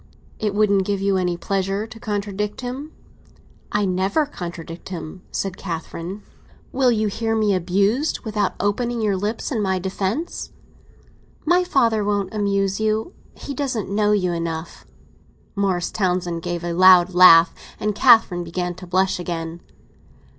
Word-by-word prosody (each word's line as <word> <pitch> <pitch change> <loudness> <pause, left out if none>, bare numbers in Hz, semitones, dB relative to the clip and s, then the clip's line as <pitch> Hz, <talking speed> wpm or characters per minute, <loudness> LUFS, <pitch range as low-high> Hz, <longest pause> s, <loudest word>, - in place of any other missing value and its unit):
"It 210 -2 -1
wouldn't 200 -2 +3
give 200 -1 0
you 195 0 +1
any 180 -2 0
pleasure 195 +3 -1
to 225 0 -12
contradict 210 -1 -3
him?" 260 +5 -6 0.8
"I 205 -1 +1
never 190 - +1
contradict 170 - -8
him," 170 0 -7
said 190 -1 -3
Catherine. 170 +2 -6 0.5
"Will 260 -1 +3
you 220 -2 +1
hear 225 +2 -1
me 215 -2 +2
abused 200 - +1
without 210 -4 -1
opening 235 +4 -1
your 205 -2 +1
lips 210 +8 -3
in 230 -5 0
my 190 -2 0
defence?" 195 - -3 1.0
"My 355 +3 +4
father 230 -10 +2
won't 200 -1 -1
abuse 200 -2 0
you. 220 - -1 0.2
He 285 - -7
doesn't 250 -8 -3
know 210 +1 +2
you 185 -4 +1
enough." 165 -1 -5 0.7
Morris 190 -3 0
Townsend 180 -3 -1
gave 175 0 -4
a 175 0 -2
loud 185 0 +6
laugh, 170 -2 +8 0.3
and 210 0 -1
Catherine 215 -6 +5
began 175 +1 -3
to 180 +1 -11
blush 185 +1 +1
again. 170 -1 -5
195 Hz, 145 wpm, -22 LUFS, 180-215 Hz, 1.0 s, laugh